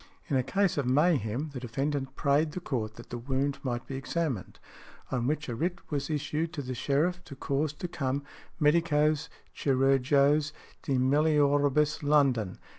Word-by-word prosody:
In 140 - +1
a 130 - +4
case 195 +4 +1
of 135 - -1
mayhem 145 - +1
the 130 - -4
defendant 135 +3 -3
prayed 150 +2 +2
the - - -3
court 115 -10 -3
that 120 - -13
the 120 - -4
wound 135 +3 -1
might 120 -3 -3
be 135 - -6
examined, 135 - -3 0.5
on 125 -2 0
which 150 +1 -1
a 120 - -3
writ 175 +9 -1
was 140 0 -2
issued 155 +2 -2
to 145 -4 -4
the 130 0 -4
sheriff 155 +8 0
to 140 - -9
cause 140 +2 -1
to 180 - -5
come 140 -3 -2 0.4
"_medicos 150 0 +2 0.3
chirurgos 140 +2 +3 0.3
de 140 - -2
melioribus 145 +2 +3
London. 135 -10 +2
145 Hz, 160 wpm, -29 LUFS, 130-150 Hz, 0.5 s, a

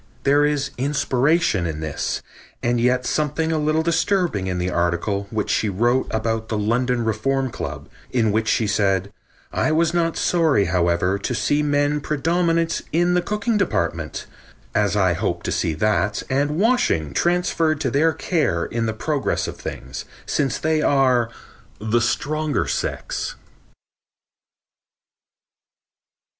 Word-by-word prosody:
There 145 +1 +4
is 145 -2 0
inspiration 135 - +1
in 80 -2 -4
this, 80 -2 -3 0.4
and 120 0 +1
yet 125 +1 +2
something 155 +2 0
a 160 - +1
little 155 +1 +1
disturbing 170 - +1
in 90 -1 -2
the 90 +1 -1
article 85 +4 0
which 110 -2 -2
she 110 - +1
wrote 120 +7 +1
about 110 0 -2
the 110 - -1
London 120 +3 0
Reform 130 +4 0
Club, 75 -7 -6 0.2
in 115 -4 +1
which 110 +1 0
she 110 - +2
said: 100 -1 +1 0.4
"I - - +1
was 165 +2 +2
not 165 -1 +1
sorry, 160 - +2
however, 90 +2 +1
to 120 +5 -2
see 145 +5 +1
men 145 0 +1
predominant 165 +3 0
in 175 +2 +2
the 180 - +3
cooking 210 +3 -1
department, 85 - -1 0.5
as - - +1
I - - +3
hope - - -2
to - - -2
see 80 - 0
that 105 +2 0
and 145 +3 +1
washing 200 - +2
transferred 170 - +1
to 130 - 0
their 155 +5 +3
care 155 - 0
in 115 -1 -2
the 110 - -1
progress 140 +6 -1
of - - -6
things, - - -7 0.2
since 135 -5 0
they 155 0 +1
are 130 -5 +3 0.5
'the 110 +3 +1
stronger 150 +6 0
sex.'" - - -3
130 Hz, 140 wpm, -22 LUFS, 105-155 Hz, 0.5 s, There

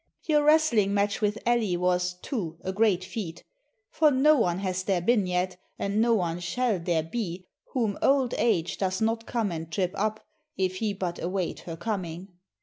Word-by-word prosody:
Your 300 -3 +3
wrestling 290 -10 +4
match 205 +1 +1
with 210 0 +1
Elli 230 -7 +2
was, 180 0 +1
too, 175 - -3
a 190 - -3
great 200 -3 +2
feat, 185 -3 -6 0.5
for 310 -1 +4
no 295 +3 +5
one 180 -10 +1
has 185 -1 -2
there 185 -1 +1
been 205 +1 +2
yet, 180 0 -1 0.2
and 200 +2 0
no 230 0 +4
one 175 -4 -1
shall 215 +4 0
there 165 -2 0
be 185 -1 -4 0.3
whom 225 -6 0
old 270 -3 +3
age 175 -8 +1
does 190 -1 0
not 225 +1 0
come 225 -5 -1
and 165 -1 -5
trip 180 -1 0
up, 215 +1 -2 0.3
if 185 -1 0
he 215 +1 0
but 180 -3 -4
await 180 0 -2
her 165 -1 -7
coming. 185 -3 -4
195 Hz, 180 wpm, -27 LUFS, 180-225 Hz, 0.5 s, no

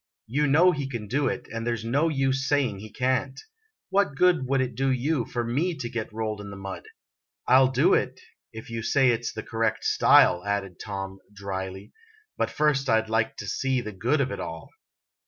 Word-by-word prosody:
You 145 +6 0
know 165 +6 +5
he 140 -4 -3
can 115 -5 -5
do 135 +5 0
it, - - -3
and 115 0 -3
there's 115 -1 -2
no 140 +8 +2
use 135 -2 0
saying 130 -9 +1
he 110 +2 -9
can't. 130 +2 -1 0.5
What 195 -6 +1
good 170 -4 +3
would 135 +1 +1
it 130 -2 -1
do 135 +4 0
you 130 0 0
for 120 +1 -3
me 150 +10 -1
to 120 - -4
get 115 -2 -4
rolled 110 -1 -3
in 100 - -8
the 100 - -8
mud? 95 -1 -7 0.6
I 130 - +6
'11 130 0 +4
do - - +4
it, - - 0 0.3
if 110 +1 -10
you 115 0 -3
say 130 +2 +3
it 120 0 -2
's - - -1
the 110 - -6
correct 115 -1 -1
style," 90 0 +5
added 100 -3 -3
Tom, 95 -2 -6
dryly; 95 0 -6 0.4
"but - - -1
first 145 -3 +1
I 110 - +5
'd 110 0 -6
like 110 0 0
to - - -6
see 130 +4 0
the 110 -3 -5
good 120 +10 +1
of 130 -1 -1
it - - -5
all." 80 -1 -7
120 Hz, 210 wpm, -26 LUFS, 110-135 Hz, 0.6 s, I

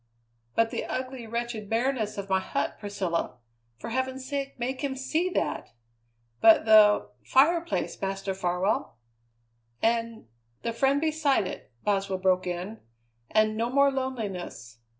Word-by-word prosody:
"But 230 0 +3
the - - -2
ugly, 255 -2 -5
wretched 235 -2 -4
bareness 230 -2 0
of 200 -1 -4
my 190 -1 +2
hut, 190 - -2
Priscilla! 190 - -2 0.4
For 230 - -7
heaven's 260 +1 -2
sake, 275 -1 -3
make 255 +2 -3
him 275 -2 -2
see 315 +7 0
that!" - - -2 0.7
"But 225 -1 +7
the 215 -1 +6
fireplace, 335 +5 +2
Master 195 0 -2
Farwell!" 180 - -1 0.8
"And 230 0 0 0.4
the 230 - -1
friend 270 +4 +2
beside 305 -7 +1
it!" 185 - -7
Boswell 195 -2 0
broke 185 0 +1
in; 180 +5 -4 0.5
"and 215 0 +3
no 230 +2 0
more 280 +2 +4
loneliness. 205 - -5
225 Hz, 130 wpm, -27 LUFS, 195-265 Hz, 0.8 s, But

